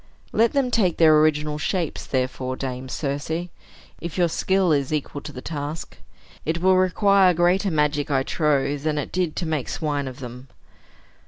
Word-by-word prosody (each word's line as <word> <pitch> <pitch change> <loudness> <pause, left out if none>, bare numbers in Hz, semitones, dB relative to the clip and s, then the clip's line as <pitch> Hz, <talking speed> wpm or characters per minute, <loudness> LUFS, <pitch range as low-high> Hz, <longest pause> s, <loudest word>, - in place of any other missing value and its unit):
Let 230 +1 +3
them 270 -3 +1
take 190 -8 +2
their 160 -2 +6
original 150 -1 +1
shapes, 170 0 -2
therefore, 130 0 -2
Dame 130 -1 -5
Circe, 160 +6 -3 0.5
if 170 -1 -6
your 175 -2 +3
skill 190 +1 +1
is 140 -2 +1
equal 150 -1 -3
to 150 - -8
the 125 -3 -9
task. 150 0 -5 0.5
It 165 +2 -1
will 185 +2 +4
require 185 0 +4
greater 180 +4 +2
magic, 150 -2 0
I 135 -2 +2
trow, 145 -2 +1
than 150 +1 -2
it 145 - -3
did 180 -4 -1
to 175 - -2
make 155 -5 -2
swine 145 -3 -2
of 130 -1 -7
them." 125 0 -9
155 Hz, 170 wpm, -23 LUFS, 140-175 Hz, 0.5 s, their